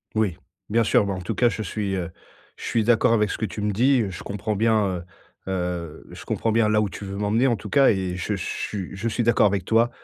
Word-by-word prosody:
Oui, 105 -6 +1 0.3
bien 115 +2 +3
sûr. 105 - +3
Bah 100 - -2
en 95 - -5
tout 90 - -4
cas, 120 -1 +4
je 110 - -4
suis, 100 0 -2
heu 85 -3 -3 0.5
je - - -12
suis 115 - +1
d'accord 115 0 +4
avec 105 -3 +2
ce - - -3
que 110 - -1
tu 105 +1 -6
me 105 0 0
dis. 120 -1 +2
Je 90 - -8
comprends 105 +1 -3
bien, 110 0 +3
heu 90 -2 -3 0.5
heu 90 -3 -4
je - - -10
comprends 115 - -1
bien 115 -1 +3
là 105 0 +3
où 105 - 0
tu 100 - -9
veux 100 0 -6
m'emmener 105 +6 +2
en 120 - +2
tout - - -9
cas 140 -2 +5
et 95 -3 0
je 90 +4 -2
suis 95 +1 -4
je 110 +4 -3
suis 120 +2 -1
d'accord 115 -2 +4
avec 100 -3 -1
toi. 115 +3 +3
105 Hz, 255 wpm, -24 LUFS, 95-115 Hz, 0.5 s, cas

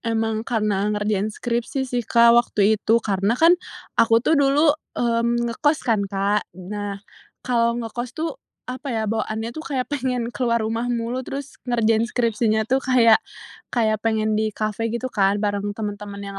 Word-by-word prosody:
Emang 225 -1 -1
karena 210 -4 0
ngerjain 210 0 0
skripsi 240 +4 -2
sih, 245 -1 -2
Kak, 235 0 +6
waktu 220 -3 +3
itu. 225 - +3
Karena 200 +3 +1
kan 330 +4 +6 0.5
aku 225 0 +5
tuh - - +3
dulu, 285 +2 +4 0.2
mmm, 235 0 +1
ngekos 295 +6 +1
kan, 225 -4 +2
Kak. 200 +1 0
Nah, 200 +2 -5 0.5
kalau 235 -2 +1
ngekos 240 +2 -6
tuh 325 +1 -2 0.3
apa 255 +3 -6
ya, 220 - -1
bawaannya 220 0 -2
tuh 315 - -7
kayak 260 -3 -2
pengen 250 -4 -1
keluar 235 -3 0
rumah 230 +2 -2
mulu 240 +1 -2
terus 280 +1 -7
ngerjain 225 -1 +2
skripsinya 225 -2 +1
tuh 260 +4 +1
kayak 245 -4 +5 0.5
kayak 220 -3 +1
pengen 220 -1 +1
di 215 -1 0
kafe 215 +1 -2
gitu 250 +2 -3
kan 200 -1 +2
bareng 205 0 -1
teman-teman 205 -1 -5
yang 195 0 -7
230 Hz, 160 wpm, -22 LUFS, 210-245 Hz, 0.5 s, Kak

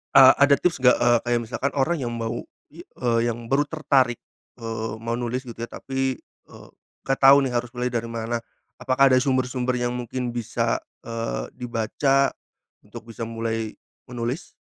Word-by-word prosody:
Ah, 130 -1 +10
ada 140 0 +6
tips 170 0 0
nggak? 125 -1 +6
E - - +1 0.2
kayak 120 0 +2
misalkan 125 +4 -2
orang 155 +4 +1
yang 125 - -3
mau, 115 0 -3 0.3
i - - -15
eee, 120 -2 0
yang 115 0 -5
baru 145 +2 +2
tertarik, 140 -6 +2 0.4
eee, 115 -1 -4
mau 115 +1 -5
nulis 125 +1 -2
gitu 120 -3 -10
ya 115 - -4
tapi 135 0 -2
e - - -25 0.5
gak 135 0 -1
tahu 140 +1 +7
nih 130 - -1
harus 120 0 -1
mulai 125 0 -1
dari 115 -1 -2
mana, 115 0 -3 0.4
apakah 135 +1 +3
ada 130 - +6
sumber-sumber 130 -1 0
yang 120 0 -1
mungkin 125 0 -4
bisa, 120 -2 -1 0.2
eee, 115 - -4
dibaca, 125 +3 +1 0.5
untuk 110 +2 -12
bisa 115 0 -5
mulai 115 -1 -3 0.3
menulis? 125 +8 -4
125 Hz, 170 wpm, -24 LUFS, 115-135 Hz, 0.5 s, Ah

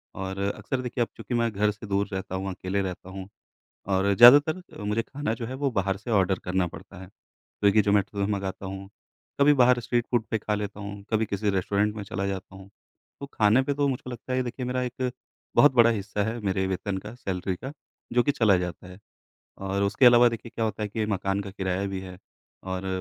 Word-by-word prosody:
और 95 0 -5 0.2
अक्सर 130 -2 -3
देखिए 125 0 -3
अब - - -4
चूँकि - - -6
मैं 115 -1 +1
घर 105 +1 +1
से 105 +1 -10
दूर 100 +1 0
रहता 95 -1 -4
हूँ, 95 +1 -3
अकेले 95 +2 -2
रहता 90 0 -6
हूँ 95 0 -7 0.6
और 100 +1 +2
ज़्यादातर 145 - +8 0.2
अ, - - -6
मुझे 105 +2 0
खाना 140 -1 -3
जो 115 - -5
है 130 - -5
वो 140 0 -1
बाहर 95 -3 0
से 110 +4 -7
ऑर्डर 95 -3 +2
करना 90 0 +1
पड़ता 85 - -12
है। 95 - -10
स्विगी, 100 +2 -1
ज़ोमाटो 100 -1 +1
से 105 - -2
मँगाता 100 -1 -3
हूँ, 95 +1 -7 0.5
कभी 145 +1 +7
बाहर 125 -2 +5
स्ट्रीट 120 0 0
फ़ूड 120 -3 +1
पे 110 - +2
खा 105 0 -1
लेता 105 0 -5
हूँ, 100 0 -7
कभी 110 0 +2
किसी 100 0 -1
रेस्टोरेंट 100 +2 0
में 105 - -5
चला 100 -1 -3
जाता 95 -1 -5
हूँ। 95 0 -12 0.5
तो - - -4
खाने 110 +4 +4
पे 145 - -1
तो 145 0 +1
मुझको 130 -1 -3
लगता 125 +1 -7
है - - +1
ये - - +1
देखिए 125 +1 -5
मेरा 125 +1 -1
एक 125 0 -3 0.4
बहुत 145 - +6
बड़ा 115 -1 +7
हिस्सा 105 -1 -2
है 110 +3 -3
मेरे 95 -2 0
वेतन 95 +1 -2
का, 115 - -9
सैलरी 95 -5 -3
का 135 +9 -7 0.4
जो 120 0 +4
कि 145 - +2
चला 110 -8 +3
जाता 90 0 -5
है। 90 +1 -12 0.6
और 95 +1 -2
उसके 100 +6 +4
अलावा 120 0 +8
देखिए 115 0 -7
क्या 115 - -1
होता 110 -1 -2
है 105 - -1
कि 110 0 -2
मकान 95 -1 -1
का 100 - -7
किराया 95 0 -2
भी 95 -1 -4
है 90 -1 -9 0.4
और 95 0 -4
105 Hz, 225 wpm, -26 LUFS, 95-120 Hz, 0.6 s, ज़्यादातर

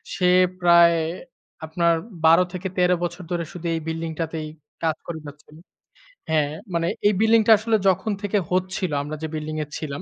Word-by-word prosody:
সে 180 -1 +2 0.3
প্রায় 170 -1 +6 0.7
আপনার 170 +1 +1 0.3
১২ 165 +3 +6
থেকে 185 +1 -4
১৩ 180 0 +3
বছর 175 +1 -4
ধরে 175 -1 -1
শুধু 175 -1 -9
এই - - -2
বিল্ডিংটাতেই 160 -1 -4 0.4
কাজ 160 -1 +1
করে 165 -2 -5
যাচ্ছিল। 150 +1 -14 0.8
হ্যাঁ 150 -2 +1 0.2
মানে 170 0 0 0.2
এই 210 - +3
বিল্ডিং 225 0 +5
টা 225 - +6
আসলে 220 0 +1
যখন 190 +4 0
থেকে 205 +1 0
হচ্ছিল 185 -1 -1
আমরা 150 +1 -5
যে - - -1
বিল্ডিং 155 0 -4
এ - - -26
ছিলাম 140 -3 -5
170 Hz, 170 wpm, -23 LUFS, 160-185 Hz, 0.8 s, প্রায়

